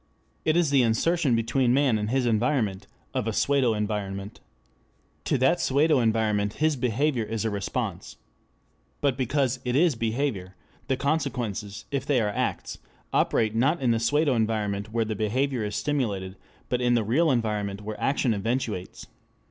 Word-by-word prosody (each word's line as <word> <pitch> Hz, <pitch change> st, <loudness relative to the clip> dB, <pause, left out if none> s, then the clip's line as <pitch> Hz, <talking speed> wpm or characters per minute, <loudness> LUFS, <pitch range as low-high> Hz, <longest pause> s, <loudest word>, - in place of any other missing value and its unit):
It 155 Hz, +1 st, +3 dB
is 165 Hz, -5 st, +2 dB
the 140 Hz, -2 st, +5 dB
insertion 130 Hz, +4 st, +2 dB
between 120 Hz, +2 st, +2 dB
man 135 Hz, -6 st, +3 dB
and 105 Hz, 0 st, -2 dB
his 130 Hz, +1 st, +1 dB
environment 115 Hz, -3 st, 0 dB, 0.3 s
of -, -, -1 dB
a 115 Hz, -, -1 dB
pseudo 130 Hz, -2 st, +2 dB
environment. 100 Hz, -1 st, -4 dB, 0.9 s
To -, -, +1 dB
that 135 Hz, +7 st, +3 dB
pseudo 145 Hz, +2 st, +3 dB
environment 110 Hz, -3 st, +1 dB
his 155 Hz, 0 st, +1 dB
behavior 125 Hz, +1 st, 0 dB
is 110 Hz, 0 st, -3 dB
a 110 Hz, -, 0 dB
response. 100 Hz, -1 st, -4 dB, 0.8 s
But 140 Hz, -3 st, +1 dB
because 130 Hz, 0 st, 0 dB
it 125 Hz, -1 st, -1 dB
is 165 Hz, +2 st, +4 dB
behavior, 115 Hz, -5 st, -2 dB, 0.3 s
the 130 Hz, -, 0 dB
consequences, 120 Hz, -8 st, -2 dB
if 140 Hz, -2 st, -1 dB
they 140 Hz, -4 st, +3 dB
are 105 Hz, -2 st, +1 dB
acts, 105 Hz, -, -3 dB, 0.3 s
operate 110 Hz, -1 st, +2 dB
not 135 Hz, +9 st, +2 dB
in 125 Hz, -3 st, +2 dB
the 115 Hz, -, +1 dB
pseudo 145 Hz, +5 st, +2 dB
environment 110 Hz, -2 st, -1 dB
where 115 Hz, 0 st, 0 dB
the 110 Hz, -, -2 dB
behavior 120 Hz, +4 st, -1 dB
is 105 Hz, 0 st, -3 dB
stimulated, 105 Hz, -11 st, -2 dB, 0.3 s
but 125 Hz, 0 st, -1 dB
in 120 Hz, 0 st, +3 dB
the 115 Hz, -, +2 dB
real 145 Hz, +10 st, +2 dB
environment 105 Hz, -5 st, -1 dB
where 105 Hz, 0 st, -6 dB
action 135 Hz, -3 st, +1 dB
eventuates. 105 Hz, -2 st, -3 dB
115 Hz, 160 wpm, -26 LUFS, 105-135 Hz, 0.9 s, the